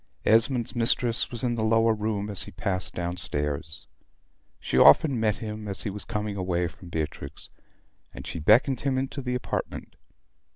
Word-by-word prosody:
Esmond's 115 +2 +3
mistress 120 0 +1
was 120 +1 +2
in 120 -1 +1
the 115 -2 -2
lower 115 +1 +3
room 105 -1 -2
as 100 - 0
he - - -10
passed 95 -1 -1
down 90 0 -3
stairs. 75 0 -3 0.7
She - - -4
often 125 - +6
met 110 -2 +1
him 105 -1 -7
as 100 - -3
he 105 - -3
was 105 +1 -7
coming 105 -2 -3
away 90 -2 -1
from 85 +2 -14
Beatrix; 75 -4 -6 0.6
and - - -10
she - - -5
beckoned 115 - +4
him 135 -2 -1
into 135 +1 -3
the 125 -1 -2
apartment. 125 - -5
105 Hz, 170 wpm, -26 LUFS, 90-120 Hz, 0.7 s, often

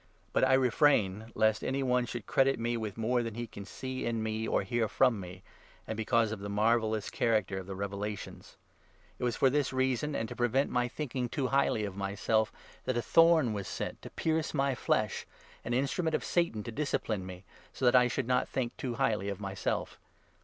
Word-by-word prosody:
But - - +2
I 130 0 +5
refrain, 115 -5 +2
lest 110 0 +2
any 135 +1 -1
one 125 -1 +1
should 120 -4 -5
credit 135 +5 +3
me 120 +1 0
with 110 -3 -4
more 120 +2 +1
than 115 -2 -4
he 120 0 -3
can 100 -3 -9
see 130 +5 -5
in 115 -2 -1
me 110 0 -2
or - - +1
hear 115 +3 0
from 120 +1 +3
me, 90 0 -9 0.4
and 110 - -4
because 110 0 +2
of 110 - -4
the 100 +1 -6
marvellous 110 +1 +1
character 105 -5 +1
of 95 - -9
the 95 - -5
revelations. 100 +1 -5 0.6
It - - -5
was 120 -3 +1
for 135 - +3
this 145 -1 +2
7 130 - -5
reason, 130 +3 +1
and 115 - -1
to - - -7
prevent 125 +3 +1
my 125 0 +1
thinking 125 -2 -3
too 135 -2 -1
highly 135 -5 +2
of 100 -2 -6
myself, 105 +2 0 0.3
that 130 - 0
a - - +1
thorn 165 -3 +5
was 100 -2 -4
sent - - -5
to - - -9
pierce 160 -1 -1
my 135 -1 +2
flesh 110 -3 0 0.2
— - - -25
an 120 - -4
instrument 140 +5 0
of - - -1
Satan 170 -12 0
to 115 - -6
discipline 110 -6 -1
me 90 0 -9
— - - -25
so 130 - -3
that 125 - +5
I 125 -1 +6
should 125 +1 -2
not 125 0 +1
think 125 -3 -2
too 125 -3 -3
highly 110 -6 0
of 100 -1 -4
myself. 100 -1 -3
115 Hz, 215 wpm, -31 LUFS, 105-130 Hz, 0.6 s, I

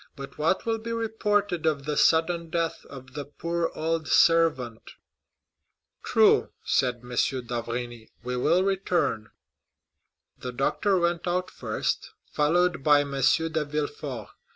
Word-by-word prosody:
But 140 0 -10
what 165 +5 +1
will 225 -1 0
be 230 +1 -6
reported 205 -6 0
of 145 -3 0
the 150 0 -2
sudden 165 +1 +2
death 165 0 -2
of 135 -1 -11
the 145 0 -4
poor 170 +4 -3
old 160 0 -1
servant?" 150 -9 +2 1.1
"True," - - +4
said 120 -2 +1
M. 125 - -12
d'Avrigny; 120 -2 -3
"we 125 +1 -3
will 165 +9 +2
return." 185 - 0 1.1
The 125 -1 -6
doctor 185 +9 +1
went 170 0 0
out 180 +1 -1
first, - - -3 0.2
followed 175 +1 +1
by 145 0 +5
M. 140 -1 -5
de 160 +3 +2
Villefort. 145 -5 -4
155 Hz, 130 wpm, -26 LUFS, 135-175 Hz, 1.1 s, by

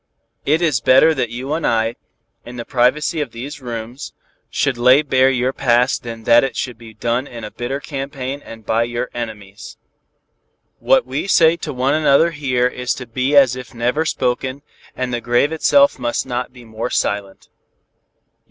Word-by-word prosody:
It 155 +4 +2
is 145 -8 +1
better 135 +7 +5
that 120 - -2
you 130 +5 -4
and 165 - -2
I, 115 0 +1 0.5
in 120 - -10
the 120 -1 -6
privacy 145 +5 +1
of 135 -6 -5
these 135 +5 -7
rooms, 120 +2 -7 0.4
should 140 -3 0
lay 130 +4 +5
bare 130 -2 +3
your 130 0 0
past 125 0 +2
than 115 -1 -8
that 115 +2 +5
it 135 -4 -2
should 125 -3 -4
be 110 -2 -13
done 120 +4 -1
in 115 -3 -9
a 105 - -6
bitter 125 +3 -4
campaign 140 -1 -5
and 115 -1 -12
by 115 +1 +1
your 120 +1 -4
enemies. 110 -2 -8 1.0
What - - +3
we - - -3
say 165 -4 +5
to 155 - -5
one 130 +1 0
another 155 +1 +4
here 130 -5 0
is 125 0 -1
to 125 - -8
be 130 +5 -1
as 135 -3 +6
if 125 -2 -10
never 125 +7 0
spoken, 130 -2 -2 0.3
and 130 -1 -3
the 120 - -2
grave 120 +5 +2
itself 280 - +3
must 120 - -1
not 125 -1 -3
be 125 -2 -15
more 110 +2 -5
silent. 100 -4 -2
125 Hz, 180 wpm, -19 LUFS, 120-140 Hz, 1.0 s, as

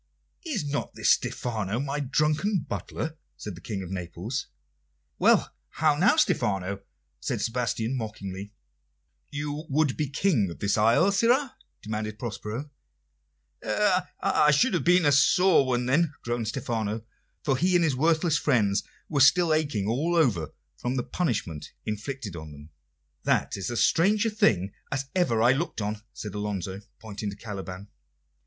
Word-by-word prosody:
"Is 275 - -2
not 145 0 -3
this - - +3
Stephano, 110 -3 -1
my 140 +1 -2
drunken 150 +8 +1
butler?" 160 0 -4 0.2
said 105 - -6
the 85 - -11
King 100 -4 -4
of 90 - -8
Naples. 95 +7 -4 0.7
"Why, - - +5 0.3
how 155 -1 +3
now, 185 - +4
Stephano?" 100 - +1 0.4
said - - -2
Sebastian 115 0 -1
mockingly. 100 -4 -6 0.8
"You 145 +2 -4
would 145 -1 +2
be 150 -3 -2
King 135 - +1
of 85 - -8
the 100 -1 0
isle, 115 - +4
sirrah?" 245 +6 +2 0.3
demanded 110 0 -4
Prospero. 115 +5 -5 0.9
"I 180 - +2
should 190 - +4
have 175 - +1
been 175 -1 +4
a 145 - +5
sore 155 +2 +5
one, 125 -1 0
then," 150 +4 +2
groaned 120 -1 -2
Stephano, 110 -1 -2 0.4
for 135 - +2
he 180 +6 +2
and 175 - +4
his 150 -5 +2
worthless 160 +2 +2
friends 105 -8 +2 0.3
were 145 - -1
still 170 +4 +6
aching 145 -11 0
all 150 +10 0
over 100 - +2 0.3
from 125 +7 -2
the 125 - 0
punishment 105 - -3
inflicted 105 -1 -4
on 80 -2 -8
them. 75 +1 -12 0.6
"That - - +1
is 100 +2 -4
as 120 - 0
strange 205 +6 +3
a 225 - +1
thing 105 - +2 0.2
as 135 0 -1
ever 120 -12 +2
I 120 - +6
looked 145 +2 -1
on," 105 0 -3
said 105 -3 -7
Alonso, 100 -2 -4 0.2
pointing 105 -1 -6
to 100 - -7
Caliban. 100 -2 -7
125 Hz, 150 wpm, -27 LUFS, 105-155 Hz, 0.9 s, still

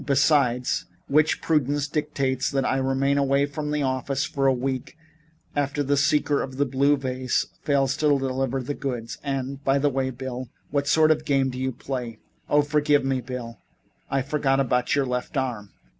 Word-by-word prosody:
Besides 135 -3 +2 0.2
which, 155 +2 +2
prudence 145 -2 +1
dictates 140 -3 -1
that 135 -2 0
I 135 - +1
remain 135 +1 +1
away 140 0 +3
from 150 +1 -5
the 150 -1 0
office 135 +2 -1
for 135 -1 0
a - - +6
week 130 +3 -3 0.6
after 145 0 0
the 145 +1 +1
seeker 145 +1 +2
of 130 -1 -6
blue 140 +2 +3
vases 130 -1 -1
fails 135 -2 +1
to 155 - +1
deliver 135 -2 0
the 145 - -3
goods 125 -5 -4
and 135 0 -3
by 135 0 +3
the 145 +1 +2
way, 135 -1 -1
Bill, 130 -1 -6 0.2
what 140 -1 0
sort 155 0 +5
of 155 - +3
a - - -15
game 135 -2 +1
do 125 - -6
you 130 0 -1
play? 125 -2 -5 0.3
Oh, 145 0 +4
forgive 145 -1 +2
me, 135 -1 0
Bill. 120 -1 -7 0.5
I 135 -1 0
forgot 140 -1 +1
about 125 -1 +1
your 140 -2 +2
left 125 +3 -3
arm." 120 -6 -2
135 Hz, 180 wpm, -25 LUFS, 130-145 Hz, 0.6 s, a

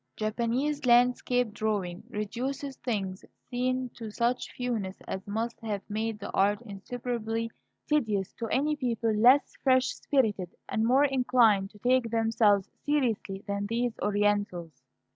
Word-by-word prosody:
Japanese 240 +7 -1
landscape 245 -1 +3
drawing 205 -5 -2
reduces 260 +6 -4
things 195 -6 -3 0.3
seen 255 +1 0
to 230 -2 -8
such 235 +3 -1
fewness 225 -7 -3
as 190 +1 -5
must 225 +3 -3
have 210 -3 -4
made 220 +1 -2
the 205 - -7
art 200 +1 +2
insuperably 230 +1 -4 0.4
tedious 215 -11 0
to 230 - -5
any 295 +6 +1
people 230 -5 0
less 245 +7 +5
fresh 260 -1 +4
spirited 215 -10 0 0.2
and 220 - 0
more 265 +5 +5
inclined 245 -7 +3
to 210 - -17
take 245 +2 +2
themselves 225 -3 +3 0.2
seriously 230 -9 0
than 200 0 -2
these 235 +2 0
Orientals. 205 -5 0
225 Hz, 130 wpm, -29 LUFS, 205-250 Hz, 0.4 s, less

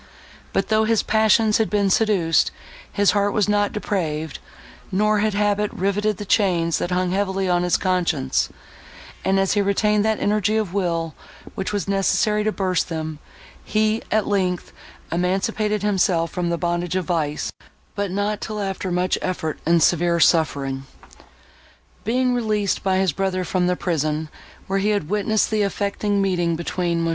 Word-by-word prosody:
But, - - -1
though 220 0 +3
his 225 -1 +2
passions 220 0 +3
had 220 - +1
been 200 -2 +1
seduced, 185 -7 +3 0.4
his 205 -1 +3
heart 205 0 +1
was 210 -2 +2
not 205 -1 +2
depraved, 160 -7 -3 0.5
nor 210 +2 +2
had 215 -1 0
habit 205 0 +1
riveted 205 +2 0
the 205 - -6
chains, 175 -6 +2
that - - -2
hung 180 0 0
heavily 195 0 0
on 175 -1 +2
his 180 0 +2
conscience; 170 -8 0 0.7
and, 195 0 +2
as 195 0 +2
he 205 - +2
retained 205 +1 +2
that 220 0 +1
energy 210 +1 +1
of 210 -5 -2
will, 170 -5 -1 0.4
which 190 - -3
was 205 -2 -2
necessary 205 +2 +1
to 215 - +1
burst 185 -4 -1
them, 160 -2 -4 0.4
he, 215 +1 +1
at 215 -1 +1
length, 185 -3 -1 0.4
emancipated 195 +4 0
himself 185 -5 +1
from 175 -1 -2
the 170 - 0
bondage 175 +1 -1
of 185 -2 -1
vice, 155 -4 -1 0.4
but 200 -1 -2
not 205 +2 -2
till 215 -1 -4
after 195 -2 -3
much 180 +1 0
effort 160 -4 -3
and 170 -1 +4
severe 170 0 +2
suffering. 140 -5 +2 1.2
Being 250 +3 +1
released 215 -4 0
by 190 -1 +1
his 190 -2 +2
brother 185 +2 -1
from 180 +1 0
the 180 - +1
prison, 155 -3 -1 0.4
where 195 +1 0
he 205 +2 +1
had 205 -7 -1
witnessed 210 +2 +1
the 215 -1 +1
affecting 200 0 0
meeting 175 -3 +1
between 170 0 -1
Mons. 165 - 0
195 Hz, 165 wpm, -22 LUFS, 175-210 Hz, 1.2 s, and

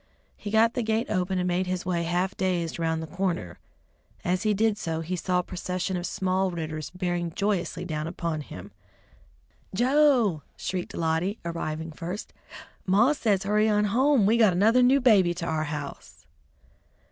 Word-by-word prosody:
He 205 - -7
got 225 +2 +4
the 245 - -1
gate 220 +1 -1
open 185 +1 0
and 180 0 0
made 180 +1 0
his 185 0 -3
way 175 -2 0
half 175 +3 -1
dazed 175 -3 -1
around 160 -1 0
the - - -4
corner. 165 - -3 0.7
As 180 +1 +1
he 215 -1 +1
did 220 +1 +2
so, 165 -2 -2
he 175 +3 -3
saw 180 +1 0
a 180 - +1
procession 180 +1 -3
of 175 0 -2
small 190 +1 0
Ridders 155 -3 -5
bearing 175 -2 -2
joyously 180 -4 -1
down 155 -2 -3
upon 170 -2 -3
him. 100 -7 -10 1.0
"Joe!" 250 - +3 0.2
shrieked 185 -2 -4
Lottie, 165 +5 0
arriving 160 -1 -4
first, 175 +6 -6 0.5
"Maw 215 +10 +4
says 210 -9 +1
hurry 210 +2 +2
on 210 0 +2
home; 265 -2 +4
we 220 +3 +4
got 215 -5 +5
another 220 +7 +4
new 260 +3 +5
baby 195 -8 +4
to 170 -1 -4
our 155 -1 -1
house." 150 -2 -7
185 Hz, 170 wpm, -26 LUFS, 170-210 Hz, 1.0 s, got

